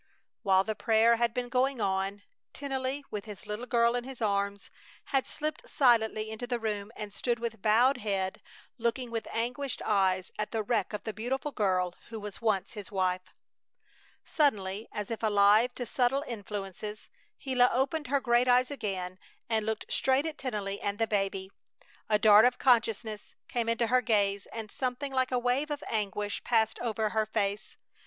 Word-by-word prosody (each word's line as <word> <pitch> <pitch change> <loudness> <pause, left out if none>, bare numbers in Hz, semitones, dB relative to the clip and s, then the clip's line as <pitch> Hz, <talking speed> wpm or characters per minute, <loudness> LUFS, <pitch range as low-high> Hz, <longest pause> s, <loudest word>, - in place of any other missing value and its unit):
While 190 -1 +4
the 220 - -2
prayer 225 +1 +4
had 235 0 +2
been 245 +1 -3
going 255 +1 +1
on, 195 0 -1 0.3
Tennelly, 270 0 -3
with 210 -2 -4
his 210 -3 -9
little 210 +4 -5
girl 235 0 +3
in 245 - -1
his 265 0 -9
arms, 200 -2 -1 0.4
had 270 -1 +2
slipped 305 0 -4
silently 220 -4 +3
into 220 +3 -5
the 245 -1 0
room 210 -2 -3
and 210 -1 -7
stood 235 +4 0
with 230 -3 -5
bowed 240 +6 +4
head 195 -4 -2 0.4
looking 235 +1 -1
with 230 -1 -3
anguished 250 +4 -2
eyes 190 -3 +2
at 210 - -1
the 225 -2 -2
wreck 235 +1 0
of 205 -1 -4
the 220 - -4
beautiful 260 +7 -2
girl 185 -6 +1 0.2
who 225 -1 -6
was 210 0 -8
once 215 -4 +1
his 210 -3 -8
wife. 185 -2 -1 0.9
Suddenly, 210 - 0
as 210 0 -5
if 230 - -3
alive 215 +2 +4
to 245 - -4
subtle 260 +3 +1
influences, 210 -1 -6 0.3
Gila 250 -2 +3
opened 290 +5 0
her 280 +2 +2
great 240 -1 +3
eyes 250 +2 +4
again 190 -8 -4 0.3
and 220 -1 0
looked 220 -1 -2
straight 265 +3 +2
at 320 -2 -3
Tennelly 205 -6 -3
and 200 0 -2
the 225 - +2
baby! 195 -2 -1 0.6
A 210 - +4
dart 210 +1 +7
of 250 - +3
consciousness 225 -4 +1
came 235 -2 -1
into 230 +1 +2
her 250 +2 +3
gaze 205 -4 +1
and 220 -2 -6
something 260 +2 -3
like 260 0 +1
a 250 - +2
wave 250 +5 0
of 295 -1 -4
anguish 205 -1 -2
passed 225 -2 +2
over 220 -2 -1
her 215 0 0
face. 205 -1 -2
225 Hz, 175 wpm, -30 LUFS, 205-250 Hz, 0.9 s, dart